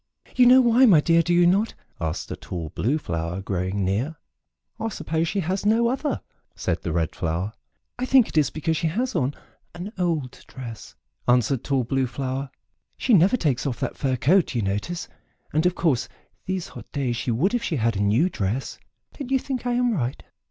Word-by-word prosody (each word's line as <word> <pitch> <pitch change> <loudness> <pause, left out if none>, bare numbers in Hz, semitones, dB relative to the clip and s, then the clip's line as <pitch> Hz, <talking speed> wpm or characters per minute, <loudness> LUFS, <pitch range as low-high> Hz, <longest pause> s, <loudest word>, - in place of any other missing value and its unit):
"You 250 -1 +6
know 255 +1 +8
why, 245 +1 +5
my 180 -8 +7
dear, 165 +2 +4
do 175 - -1
you 175 0 +5
not?" 195 +6 +2 0.2
asked 80 -2 -3
a - - -2
tall 85 -3 -6
Blue 130 - 0
Flower 85 - -3
growing 95 0 -2
near. 115 - -1 0.6
"I 225 - -1
suppose 165 -5 -2
she 200 +3 -1
has 185 +3 -2
no 225 +3 +3
other," 275 +3 -1 0.3
said - - -2
the 85 - -3
Red 80 -1 -1
Flower. 90 +5 -2 0.5
"I 255 - -1
think 260 -4 +5
it - - -11
is 150 -4 +4
because 160 +1 -1
she 165 - 0
has 240 +11 -1
on 145 -3 0 0.4
an 185 +5 -6
old 160 -8 -1
dress," 120 -4 -9 0.3
answered 125 +1 +3
tall 135 -3 +1
Blue 130 +2 0
Flower; 135 +1 -3 0.5
"she 250 - +1
never 195 +6 +5
takes 145 - 0
off 125 - -3
that - - -2
fur 130 -2 0
coat, 160 +6 +3
you 115 - +1
notice, 105 - -2 0.5
and, 155 +4 +3
of 180 - 0
course, 130 -9 +1 0.4
these 185 -2 -2
hot - - -11
days 130 -4 -1
she 125 - -3
would 140 - +1
if 245 - +1
she 170 - -2
had 115 -4 +1
a - - -2
new 110 - +3
dress. 110 - -3 0.4
Don't 275 -3 -5
you 270 - +3
think 255 -2 -4
I 245 - +1
am 245 -1 +2
right?" 130 - -2
150 Hz, 200 wpm, -24 LUFS, 115-195 Hz, 0.6 s, know